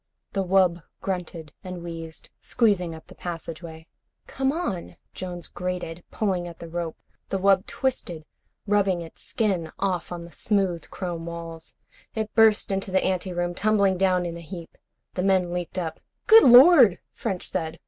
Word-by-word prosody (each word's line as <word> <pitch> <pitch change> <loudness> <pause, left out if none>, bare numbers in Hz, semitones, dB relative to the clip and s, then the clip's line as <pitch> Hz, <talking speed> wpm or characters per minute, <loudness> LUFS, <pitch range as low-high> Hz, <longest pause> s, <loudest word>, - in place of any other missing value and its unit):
The 195 - 0
wub 180 -2 +3 0.2
grunted 175 -5 -5
and 180 -2 -7
wheezed, 165 -1 -8
squeezing 190 -8 +1
up 160 - -12
the - - -14
passageway. 165 -1 -7 0.4
"Come 270 0 0
on," 295 - -3 0.2
Jones 175 -2 -6
grated, 180 -2 -5
pulling 185 -5 -1
at 170 -1 -9
the 170 - -9
rope. 170 -1 -4 0.3
The 195 - 0
wub 195 +1 +3
twisted, 175 -12 -3 0.4
rubbing 200 -4 +2
its 165 - -12
skin 185 -8 -1
off 185 -4 -1
on 170 -1 -5
the 170 - -13
smooth 190 -6 0
chrome 170 -3 -5
walls. 165 -1 -8 0.4
It 220 -1 -3
burst 220 -2 +4
into 195 0 -1
the 190 0 +2
ante 185 0 -1
room, 175 0 -1
tumbling 200 -1 +2
down 185 -1 +2
in 170 -1 -4
a 170 - -8
heap. 170 0 -9 0.4
The 180 - -2
men 185 -2 +2
leaped 180 0 -4
up. 165 -3 -3 0.3
"Good 450 0 +8
Lord," 250 - +8 0.2
French 195 -6 -3
said. 160 0 -3
180 Hz, 160 wpm, -25 LUFS, 170-195 Hz, 0.4 s, Good